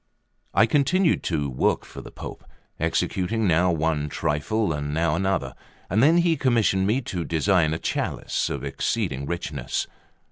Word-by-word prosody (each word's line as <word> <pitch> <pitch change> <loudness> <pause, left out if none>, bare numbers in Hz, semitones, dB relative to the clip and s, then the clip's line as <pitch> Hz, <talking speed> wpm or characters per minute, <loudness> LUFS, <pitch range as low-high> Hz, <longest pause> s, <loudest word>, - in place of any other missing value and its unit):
LVI 100 - +5
I - - +7
CONTINUED 155 +8 +2
to 75 -4 0
work 65 -2 0
for - - -10
the - - -10
Pope, - - -9 0.4
executing 105 +4 0
now 90 +1 +3
one 80 -2 0
trifle 80 +7 -1
and 75 0 -3
now 80 -1 +1
another, 95 +3 -1 0.4
when 135 - +4
he 170 -1 +3
commissioned 110 -9 +2
me 120 +6 +1
to 90 -8 -4
design 80 0 +2
a 80 - -1
chalice - - -2
of - - -4
exceeding 70 - -2
richness. 70 -6 -3
90 Hz, 150 wpm, -24 LUFS, 80-110 Hz, 0.4 s, I